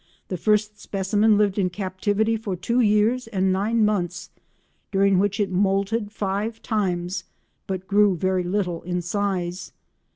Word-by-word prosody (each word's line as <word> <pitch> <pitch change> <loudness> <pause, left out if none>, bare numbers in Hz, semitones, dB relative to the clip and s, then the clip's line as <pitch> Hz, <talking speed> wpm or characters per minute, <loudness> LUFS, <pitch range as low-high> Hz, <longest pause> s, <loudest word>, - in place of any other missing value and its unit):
The 185 - -2
first 210 +2 +1
specimen 205 +2 +2
lived 205 -1 +2
in 185 -2 +2
captivity 205 +4 -1
for 215 -4 -3
two 235 +7 0
years 225 +2 +2
and 190 -4 +1
nine 215 +3 +2
months, 180 -5 -2 0.6
during 195 -1 +3
which 200 +2 0
it 200 -2 0
moulted 200 +3 0
five 210 +2 -2
times 185 -4 -1 0.4
but 190 -1 -4
grew 205 -1 +4
very 185 +2 +1
little 180 -2 -1
in 180 0 -3
size. 185 -1 -2
200 Hz, 140 wpm, -24 LUFS, 185-210 Hz, 0.6 s, grew